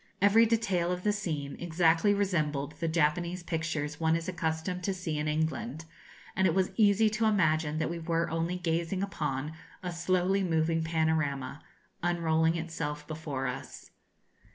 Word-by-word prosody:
Every 215 +4 +6
detail 195 -6 +1
of 180 0 -3
the 210 - +2
scene 155 -9 -3
exactly 170 +3 +3
resembled 155 -8 0
the 165 - -1
Japanese 170 +3 +1
pictures 160 -3 -2
one 160 0 +3
is 165 0 -3
accustomed 175 0 -2
to 195 - 0
see 165 -5 -3
in 150 - -1
England; 155 -1 -2 0.5
and 190 0 +3
it 170 - +1
was 190 -1 +2
easy 215 0 +5
to 215 +1 0
imagine 160 -7 +2
that 155 - 0
we 170 +1 -4
were 165 0 0
only 165 +2 -1
gazing 170 +2 -1
upon 150 -6 -3 0.3
a 180 - -2
slowly 185 +3 +1
moving 165 -1 +1
panorama, 160 -4 0 0.4
unrolling 165 -1 +2
itself 150 -3 -4
before 155 -4 -4
us. 125 - -6
165 Hz, 155 wpm, -30 LUFS, 155-180 Hz, 0.5 s, Every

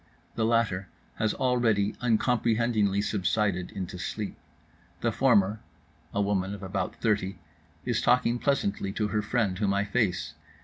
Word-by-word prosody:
The 110 - 0
latter 110 -5 +1 0.3
has 110 -1 0
already 115 -5 +2
uncomprehendingly 115 -3 +2
subsided 100 -2 0
into 95 -1 -6
sleep. 105 +2 -4 0.7
The 115 - +1
former 110 -4 +3 0.5
(a - - -2
woman 100 -1 0
of 100 - -10
about 95 -1 -3
thirty) 100 -4 0 0.5
is - - 0
talking 120 -1 +3
pleasantly 100 -9 0
to 105 0 -1
her 105 +1 0
friend, 105 -4 0
whom 100 -2 +1
I 100 +1 +1
face. 100 - 0
105 Hz, 135 wpm, -28 LUFS, 100-115 Hz, 0.7 s, former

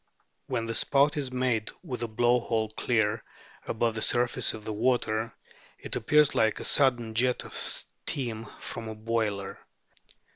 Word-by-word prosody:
When 115 - -1
the 115 - -2
spout 140 +5 +3
is 140 -4 -2
made 125 -4 0
with 130 -9 -5
the 120 - -2
blow 120 +2 +3
hole 110 -2 -1
clear 110 -1 0 0.4
above 115 0 0
the 110 - -4
surface 120 0 +2
of 110 -1 -10
the 110 - -3
water, 115 -1 +1 0.5
it - - -5
appears 150 +5 +4
like 110 -1 +2
a - - -5
sudden 120 -5 +3
jet 125 +2 +1
of - - -10
steam 115 -5 -3
from 115 - -6
a 110 - -6
boiler. 110 -3 -2
115 Hz, 155 wpm, -28 LUFS, 110-125 Hz, 0.5 s, appears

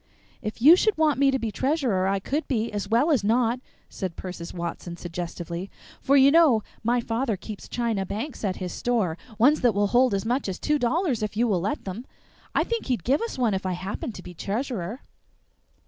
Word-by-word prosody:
"If 215 +2 -5
you 315 +5 +10
should 430 +1 +2
want 310 -3 +2
me 280 -1 +5
to 270 - +2
be 230 -4 -3
treasurer, 255 - +1
I 195 +1 +1
could 285 +11 -2
be, 230 -3 -1
as 200 -1 -3
well 245 +9 +3
as 260 -9 +2
not," 235 +3 +2 0.3
said 185 -3 -5
Persis 180 -2 -7
Watson 170 0 -5
suggestively; 175 +1 -5 0.3
"for 280 +1 +4
you 275 +1 +7
know 295 -10 +5 0.2
my 240 +2 +2
father 230 -1 -1
keeps 210 +1 -9
china 230 -5 -1
banks 225 +9 -5
at 190 -3 0
his 180 -1 -5
store 220 -9 0 0.2
ones 275 +8 +4
that 240 -5 +3
will 205 0 +3
hold 245 -3 +4
as 195 - -2
much 245 -1 0
as 185 - -3
two 300 -1 0
dollars 260 - +1
if 210 0 -3
you 240 +2 +3
will 190 -6 +1
let 200 - -2
them. 200 +7 -6 0.5
I - - +4
think 465 -1 -3
he'd 245 -9 -1
give 270 +4 +2
us 460 -8 -4
one 240 -5 +2
if 190 - -2
I 185 -1 -1
happen 190 +6 -4
to 180 - -10
be 180 - -9
treasurer." 215 - -3
225 Hz, 210 wpm, -25 LUFS, 190-265 Hz, 0.5 s, you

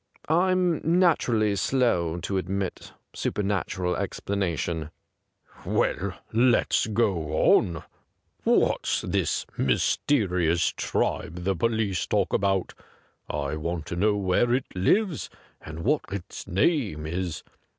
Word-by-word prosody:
' - - -28
I'm 180 0 +2
naturally 150 - +3
slow 95 -7 +1
to 95 +3 -2
admit 95 +1 -4 0.2
supernatural 95 -3 -1
explanation.' 85 -5 -2 0.7
'Well, - - 0 0.2
let's 120 0 +3
go 95 -9 +2
on. 85 -3 -2 0.6
What's - - +2
this - - -1
mysterious 90 - +1
tribe 90 +1 -2
the 95 +1 +1
police 110 -1 0
talk - - 0
about 95 -2 +1 0.4
.'' - - -44
I 75 0 -2
want 85 0 -3
to 85 - -5
know 105 +4 +2
where 100 +5 +2
it 130 - -1
lives 170 - +1 0.3
and 80 +1 -8
what 145 +4 +2
its 95 -2 -7
name 100 - +1
is. 85 0 -3
95 Hz, 110 wpm, -26 LUFS, 85-120 Hz, 0.7 s, naturally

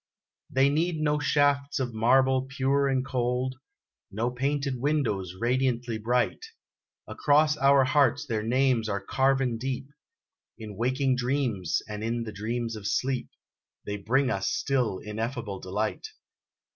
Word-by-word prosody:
They 135 +1 +3
need 160 +3 0
no 150 -1 +1
shafts 145 -1 +2
of 125 -3 -2
marble 130 +3 +3
pure 140 +1 +1
and 130 -1 0
cold 125 0 -1 0.6
No 115 +5 -2
painted 135 +1 -1
windows 115 - -1
radiantly 120 -1 0
bright; 120 - 0 0.6
Across 150 +1 +3
our 140 -1 +5
hearts 145 +1 +2
their 115 -5 -2
names 120 -1 +1
are 100 -1 -1
carven 130 +2 +1
deep 130 +1 -3 0.7
In 105 -2 -8
waking 130 +4 +1
dreams, 125 - -1
and 105 0 -6
in 115 +1 -1
the 110 - -6
dreams 115 +2 -3
of 105 -2 -5
sleep, 130 +4 -1 0.6
They 105 0 -3
bring 130 +6 +1
us 95 0 -1
still 125 -8 0
ineffable 110 -1 -4
delight. 105 - -3
125 Hz, 135 wpm, -27 LUFS, 110-135 Hz, 0.7 s, our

